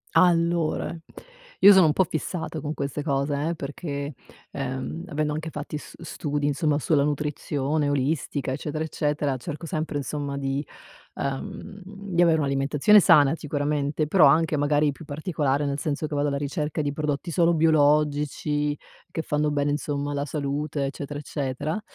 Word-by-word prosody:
Allora, 170 -2 +2 0.7
io 200 0 +10
sono 185 -4 +6
un 150 - +3
po' 190 - +4
fissata 160 0 -4
con 150 +1 -4
queste 140 +1 -3
cose, 140 -1 0 0.2
eh, 170 - -2
perché, 145 0 -5 0.4
ehm, 135 +5 -4
avendo 150 -1 -1
anche 155 +2 -4
fatti 150 -1 -6
s - - -13
studi 145 -1 -3
insomma 145 +1 +1
sulla 145 -1 +2
nutrizione, 145 0 -1
olistica, 140 -1 -1
eccetera 155 +3 -3
eccetera, 150 -3 -1
cerco 150 +6 -6
sempre 155 -1 -3
insomma 140 0 -3
di 135 +1 -2 0.5
uhm, 195 +8 -5
di 195 -2 -2
avere 165 -2 +5
un'alimentazione 140 +7 +4
sana 155 -6 +6
sicuramente, 145 0 -1
però 155 +1 +5
anche 160 +2 +3
magari 145 0 +2
più 140 - -11
particolare, 145 -2 -1
nel 140 0 -2
senso 150 0 -2
che 150 - -5
vado 145 0 +1
alla 140 -1 -1
ricerca 150 +1 -2
di 145 -1 -1
prodotti 150 +2 -2
solo 170 0 +3
biologici, 150 -1 +2 0.3
che 160 - -3
fanno 150 0 0
bene 145 0 0
insomma 145 -1 -2
alla 145 0 -2
salute, 145 0 -2
eccetera 145 +1 -5
eccetera. 145 +5 -3
150 Hz, 155 wpm, -25 LUFS, 140-155 Hz, 0.7 s, io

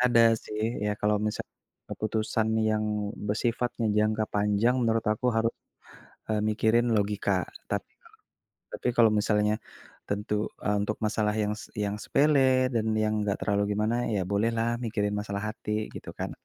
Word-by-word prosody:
ada 120 -2 +5 0.2
sih. 105 0 -5 0.2
Ya, 105 - +1
kalau 105 0 +2
misal 105 - -2 0.5
keputusan 110 0 -1 0.2
yang 110 0 +1 0.4
bersifatnya 115 +2 -1
jangka 110 0 +2
panjang 105 +4 +2
menurut 115 -1 +1
aku 110 - -3
haru 115 +1 +3 0.8
eee, 110 -1 0
mikirin 110 +2 +2
logika. 100 0 0 0.4
Tapi - - -1 0.2
kalau 455 - -19 0.6
tapi - - -2
kalau 115 -2 +6
misalnya 105 0 +2 0.5
tentu 105 +1 -2 0.3
e - - +1
untuk 105 +1 -1
masalah 105 0 0
yang 105 - 0
s 105 - -9
yang 105 0 -1
sepele 135 -3 +4
dan 110 -1 +1 0.2
yang 110 0 +1
nggak 100 -1 -1
terlalu 100 -1 +1
gimana 110 +2 +1 0.2
ya, 100 - +1
bolehlah 115 +3 +1 0.2
mikirin 105 -2 -1
masalah 100 -1 -4
hati, 110 - -8 0.2
gitu - - -7
kan? - - -3
110 Hz, 150 wpm, -28 LUFS, 105-115 Hz, 0.8 s, kalau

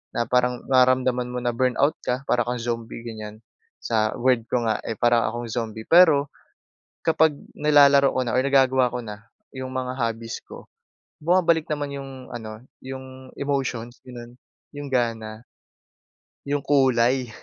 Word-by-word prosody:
na 120 - +1
parang 125 0 +1
nararamdaman 130 -1 +3
mo 125 - -3
na 120 - +1
burnout 130 +4 +1
ka, 125 +2 -2
para 120 -1 +2
akong 125 0 -2
zombie 115 -1 -4
ganyan, 110 -2 -8 0.4
sa 110 -2 0
word 120 -2 +1
ko 120 0 0
nga, 110 - 0
eh, 115 - -3
para 120 0 +2
akong 120 +1 -4
zombie. 110 -1 -4
Pero, 160 -5 +5 0.7
kapag 160 -1 +3 0.2
nilalaro 140 -2 +5
ko 130 - 0
na 120 - -2
or 130 - +3
nagagawa 130 -2 +3
ko 125 - -5
na 105 -1 -8 0.3
yung 130 0 -6
mga 130 0 -3
hobbies 115 0 -3
ko, - - -12 0.6
bumabalik 170 -1 +2
naman 145 -2 -3
yung 135 -1 -7 0.2
ano, 110 0 -8 0.2
yung 130 0 -9
emotions 130 -4 -3
ganon, 120 -2 -11 0.4
yung 145 -1 -7
gana. 115 -3 -2 1.0
Yung 145 +1 0
kulay. 130 -3 +2
125 Hz, 150 wpm, -24 LUFS, 115-135 Hz, 1.0 s, Pero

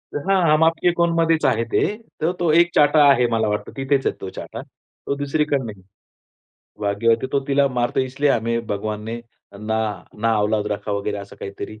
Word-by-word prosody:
हां. 190 +6 +1
हम 155 - +4
आपके 165 +2 +3
कौनमध्येच 165 -2 +2
आहे 115 -4 +2
ते. - - +2 0.4
तर 165 - +2
तो 170 -3 +2
एक 170 +2 +5
चाटा 150 0 +5
आहे 125 -3 +4
मला 110 -1 +1
वाटतं. 105 0 -3
तिथेच 135 0 0
आहे - - -1
तो 95 - -5
चाटा. - - -7
तो 140 - -8
दुसरीकडे 145 +1 0
नाही. 105 -5 -8 1.0
भाग्यवती 110 +4 +1
तो 140 - +2
तिला 140 0 +3
मारतो, 125 0 0
इसलिए 135 +2 0
हमें 115 -1 -1
भगवान 105 +1 -3
ने 115 +1 -4 0.4
ना 110 +1 -1 0.5
नाऔलाद 105 -1 +1
रखा 105 0 -4
वगैरे 100 0 -2
असं 100 0 -10
काहीतरी 100 +2 -8
125 Hz, 175 wpm, -21 LUFS, 105-145 Hz, 1.0 s, एक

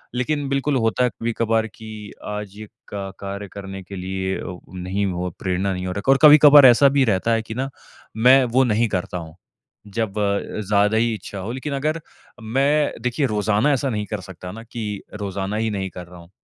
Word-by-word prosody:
लेकिन 145 +3 -1
बिल्कुल 140 +1 0
होता 115 +1 +1
है 125 - +3
कभी-कभार 115 -1 -1
कि 110 -2 -9 0.2
आज 105 -1 -5
ये 110 0 -8 0.3
क 95 -1 -5
कार्य 100 +1 -6
करने 95 -1 -7
के 100 +2 -9
लिए 95 +1 -3
अ, 90 - -6 0.2
नहीं 95 +2 -2
हो, 90 -1 -2
प्रेरणा 95 +1 -1
नहीं 90 0 -4
हो - - -2
रखा 100 +7 +1
है। - - +8
और - - +2
कभी-कभार 145 -1 +9
ऐसा 130 +3 +7
भी 135 - +5
रहता 110 +1 +1
है 115 - +2
कि 110 0 -8
ना 135 +2 -2 0.5
मैं 130 +4 +6
वो 130 - +6
नहीं 115 -1 +2
करता 90 -1 -3
हूँ, 80 -2 -9 0.5
जब 105 0 -3
अ, 100 +1 -1
ज़्यादा 105 +1 +3
ही 115 +1 +2
इच्छा 100 0 -9
हो। 100 +5 -5
लेकिन 130 +3 -4
अगर 155 +4 -1 0.4
मैं 140 +6 +1
देखिए 125 +3 0
रोज़ाना 105 +4 +1
ऐसा 135 0 0
नहीं 105 -3 -2
कर 105 -2 -4
सकता 90 -1 -9
ना 115 +4 -9
कि 110 -3 -5
रोज़ाना 100 -1 -4
ही 110 0 0
नहीं 95 -2 -3
कर 90 +1 -9
रहा 90 0 -13
हूँ। 85 0 -15
105 Hz, 210 wpm, -22 LUFS, 95-125 Hz, 0.5 s, कभी-कभार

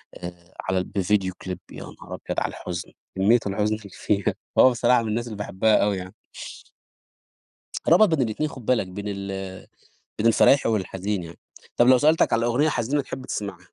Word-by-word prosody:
آآ 85 0 -10
على 95 0 -1
ال - - -1
بفيديو 95 -1 0
كليب 90 -2 -5
يا - - -8
نهار - - -9
أبيض - - -1
على - - -1
الحزن، - - -6 0.2
كميّة 105 +6 +4
الحزن 105 +2 0
اللي 105 -2 -11
فيها، 100 0 0 0.3
هو 130 - +8
بصراحة 120 0 +3
من 110 - -3
الناس 120 +3 -1
اللي 110 -3 -7
باحبها 105 +1 +1
أوي 100 -2 +2
يعني. 95 0 -8 1.7
ربط 205 +6 +7
بين 160 -5 +1
الاتنين 125 +7 -1
خُد 125 -6 -11
بالك 120 -7 +1
بين 100 +3 -7
ال 95 -1 -6 0.5
بين 110 - +1
الفرايحى 125 +3 +5
والحزين 95 -2 -2
يعني، 85 0 -10 0.4
طَب 120 - +5
لو 130 -1 +7
سألتك 155 +3 +3
على 115 +1 +2
أغنية 135 +6 +2
حزينة 140 +2 0
تحب 130 0 -8
تسمعها؟ 100 -4 -4
105 Hz, 180 wpm, -24 LUFS, 95-120 Hz, 1.7 s, هو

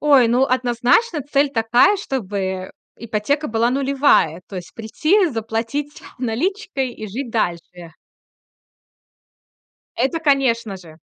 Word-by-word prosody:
Ой, 275 -6 +5
ну, 250 +3 +3
однозначно 255 - +1
цель 285 +1 +1
такая, 240 - +3
чтобы 195 - -4 0.3
ипотека 235 +7 -2
была 230 +2 +1
нулевая. 270 - +2
То 195 - -8
есть 175 -2 -8
прийти, 315 - +1
заплатить 230 +5 -4 0.2
наличкой 270 - -2
и 215 - -8
жить 240 +5 -5
дальше. 175 -5 -3 2.0
Это, 270 +7 0
конечно 245 -9 +1
же. 165 -4 -15
245 Hz, 110 wpm, -20 LUFS, 215-280 Hz, 2.0 s, Ой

